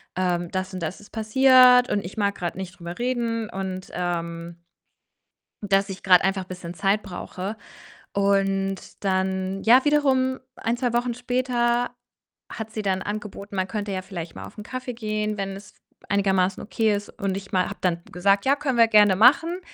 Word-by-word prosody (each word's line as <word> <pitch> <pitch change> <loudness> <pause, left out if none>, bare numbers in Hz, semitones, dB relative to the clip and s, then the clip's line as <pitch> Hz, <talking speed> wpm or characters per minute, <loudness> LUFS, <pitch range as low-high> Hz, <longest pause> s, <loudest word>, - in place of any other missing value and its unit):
ähm, 175 -2 0
das 185 0 -3
und 185 - -4
das 170 +5 -4
ist 205 - -16
passiert, 250 +2 +6
und 205 - 0
ich 180 - -8
mag 200 -1 +1
grad 175 -1 -4
nicht 185 -1 -7
drüber 170 +1 -7
reden 235 -3 -1
und, 190 -1 -5
ähm, 170 -1 -4 1.0
dass 195 -1 +1
ich 195 0 -7
grad 180 -2 +6
einfach 190 0 0
bisschen 180 -1 -8
Zeit 200 +3 +1
brauche 190 +2 -6 0.6
und 195 -1 0
dann, 190 0 -1
ja, 250 +5 +6
wiederum 265 -3 +2 0.2
1, 230 +2 -1
2 245 -1 -1
Wochen 240 0 0
später 245 -1 0 0.6
hat 220 -1 -7
sie 215 - -4
dann 190 -1 0
angeboten, 205 -1 -6
man 190 -1 -1
könnte 205 -2 -3
ja 185 -1 -3
vielleicht 175 -4 -7
mal - - -8
auf - - -14
'n 210 - -7
Kaffee 255 +1 -5
gehen, 215 -2 -2
wenn 195 0 -3
es 200 - -13 0.3
einigermaßen 195 -2 +1
okay 220 0 +1
ist 205 0 -4
und 195 -1 -1
ich 195 0 -8
ma 185 -1 +3
habe - - -7
dann 170 -2 0
gesagt: 195 +2 +2
„Ja, 280 +1 +4
können 270 -4 -2
wir 230 -1 +6
gerne 210 -3 +6
machen.“ 325 - +4
200 Hz, 180 wpm, -24 LUFS, 185-235 Hz, 1.0 s, passiert